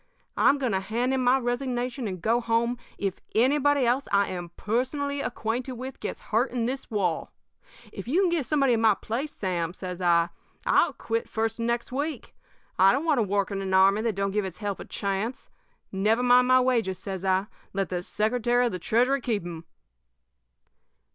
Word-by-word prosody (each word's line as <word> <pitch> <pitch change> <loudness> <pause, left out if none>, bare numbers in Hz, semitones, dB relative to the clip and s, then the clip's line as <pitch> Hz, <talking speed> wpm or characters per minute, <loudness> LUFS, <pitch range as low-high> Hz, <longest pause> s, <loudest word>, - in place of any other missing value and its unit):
I'm 285 - +4
going 260 -4 -1
to 190 - +1
hand 230 +7 -1
in 265 - +1
my 250 +2 +5
resignation 245 -1 -2
and 185 -2 -5
go 235 +2 +2
home 235 +1 0 0.2
if 195 -2 -3
anybody 285 +3 +3
else 250 +4 +1
I 200 0 +3
am 175 -2 -5
personally 280 +5 -1
acquainted 240 +2 -3
with 255 +2 -7
gets - - -5
hurt 235 +5 +3
in 240 -2 -2
this 265 +2 -4
war. 190 -7 -1 0.6
If 195 - -7
you 325 +10 +2
can 365 -3 +2
get 320 -7 0
somebody 275 -4 +3
in 225 - +1
my 220 -2 +5
place, 260 +10 -4
Sam,' 175 -3 -2
says 185 -1 -6
I, 170 -1 +3 0.4
'I'll - - +3
quit 230 0 -2
the - - -23
first 225 0 -1
of 230 - -1
next 235 +1 -1
week. 290 +4 -4 0.5
I 190 +1 +7
don't 275 +6 0
want 305 -6 +3
to - - +4
work 200 -1 0
in 195 -1 -2
an 190 -1 -1
army 195 +2 +5
that 225 -3 -1
don't 195 0 -1
give 210 +1 0
its 190 -3 -6
help 205 -3 -3
a - - -7
chance. 200 +5 -3 0.4
Never 215 +5 +1
mind 250 0 +5
my 255 0 +6
wages,' 230 -7 +1
says 190 -1 -6
I; 190 0 +2 0.3
'let 195 0 -2
the 180 -1 -2
Secretary 240 +5 +1
of 240 - 0
the 180 - -4
Treasury 250 +9 +2
keep 220 -6 -1
'em.' 170 -1 -7
230 Hz, 200 wpm, -26 LUFS, 195-255 Hz, 0.6 s, I